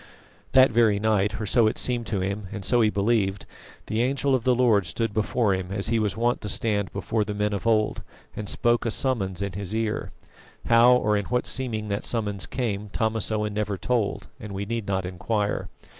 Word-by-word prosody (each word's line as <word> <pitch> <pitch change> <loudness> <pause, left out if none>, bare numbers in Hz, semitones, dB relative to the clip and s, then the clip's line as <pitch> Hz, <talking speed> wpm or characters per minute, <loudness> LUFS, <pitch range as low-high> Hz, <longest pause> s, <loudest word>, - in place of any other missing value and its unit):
That 130 -1 +6
very 110 -3 +3
night 105 0 +1
or 110 - -3
so 115 +2 +3
it 110 - -1
seemed 120 -2 +2
to 100 -4 -1
him, 100 +1 -3
and 100 -3 -4
so 120 +5 +3
he 110 - +4
believed 100 -2 0 0.4
the 110 +1 -1
Angel 135 +2 +1
of 130 -2 0
the 125 -1 +4
Lord 110 -7 +3
stood 115 +5 -2
before 110 0 +1
him 95 0 -4
as 100 0 0
he 115 - +2
was 105 -1 -1
wont 120 +2 0
to 105 - -2
stand 100 -2 0
before 105 +2 -1
the 105 0 -5
men 105 0 0
of 100 +3 -3
old, 110 -2 +1 0.3
and 105 -1 -4
spoke 120 -1 +2
a - - +1
summons 100 -7 0
in 100 -1 -4
his 100 +2 -4
ear. 110 -1 -2 0.6
How 120 +2 +6
or 105 -4 +2
in 100 - -2
what 125 0 -1
seeming 110 -5 -1
that 100 0 -2
summons 105 -4 -2
came 105 -5 -3
Thomas 110 +1 -1
Owen 105 -1 -1
never 105 -1 -2
told, 110 +2 -1
and 105 -2 -8
we 100 +1 -3
need 115 0 -4
not 95 -2 -1
inquire. 100 +3 -2
105 Hz, 210 wpm, -25 LUFS, 100-115 Hz, 0.6 s, That